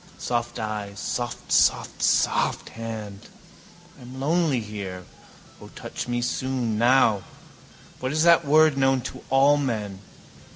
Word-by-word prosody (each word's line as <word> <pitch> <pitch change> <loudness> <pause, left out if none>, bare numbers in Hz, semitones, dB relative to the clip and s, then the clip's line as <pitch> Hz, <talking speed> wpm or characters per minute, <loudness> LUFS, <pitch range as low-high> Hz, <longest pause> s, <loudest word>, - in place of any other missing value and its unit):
Soft 120 -1 -3
eyes. 105 -2 -5
Soft 120 -2 -4
soft - - +2
soft - - +1
hand. 110 -3 -8 0.7
I - - -15
am 125 +2 -10
lonely 155 -1 +1
here. 100 -4 -7 0.6
O, - - -11
touch - - -6
me 120 0 -1
soon, 125 -3 -2
now. 120 -4 +4 0.8
What 130 +1 -3
is 155 +2 +1
that 170 0 +5
word 155 -1 +4
known 135 -1 +2
to 130 - -8
all 140 +2 +4
men? 110 -8 -3
120 Hz, 130 wpm, -24 LUFS, 110-135 Hz, 0.8 s, that